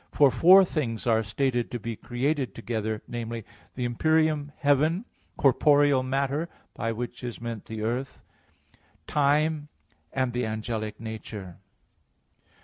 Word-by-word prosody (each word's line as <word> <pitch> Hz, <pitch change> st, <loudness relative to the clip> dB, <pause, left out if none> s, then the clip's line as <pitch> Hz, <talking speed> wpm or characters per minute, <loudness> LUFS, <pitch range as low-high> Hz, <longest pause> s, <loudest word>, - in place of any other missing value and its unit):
For 140 Hz, -3 st, +5 dB
four 185 Hz, +10 st, +7 dB
things 125 Hz, -10 st, -2 dB
are 115 Hz, -2 st, +3 dB
stated 120 Hz, +3 st, -1 dB
to 120 Hz, -, -4 dB
be 115 Hz, +1 st, -4 dB
created 130 Hz, -1 st, -2 dB
together 110 Hz, -2 st, -3 dB
viz. 115 Hz, -1 st, -5 dB, 0.3 s
the 125 Hz, -, -2 dB
empyrean 155 Hz, +3 st, +1 dB
heaven, 155 Hz, -, +2 dB, 0.3 s
corporeal 145 Hz, 0 st, +4 dB
matter, 140 Hz, +5 st, -1 dB, 0.2 s
by 115 Hz, -, -2 dB
which 120 Hz, +2 st, -5 dB
is 120 Hz, -2 st, -5 dB
meant 115 Hz, -2 st, -5 dB
the 110 Hz, -1 st, -5 dB
earth, 125 Hz, +5 st, -3 dB, 0.8 s
time, 150 Hz, +1 st, +2 dB, 0.4 s
and 130 Hz, -2 st, -1 dB
the 125 Hz, +1 st, -1 dB
angelic 110 Hz, -1 st, -3 dB
nature. 105 Hz, -5 st, -7 dB
125 Hz, 125 wpm, -27 LUFS, 115-145 Hz, 0.8 s, four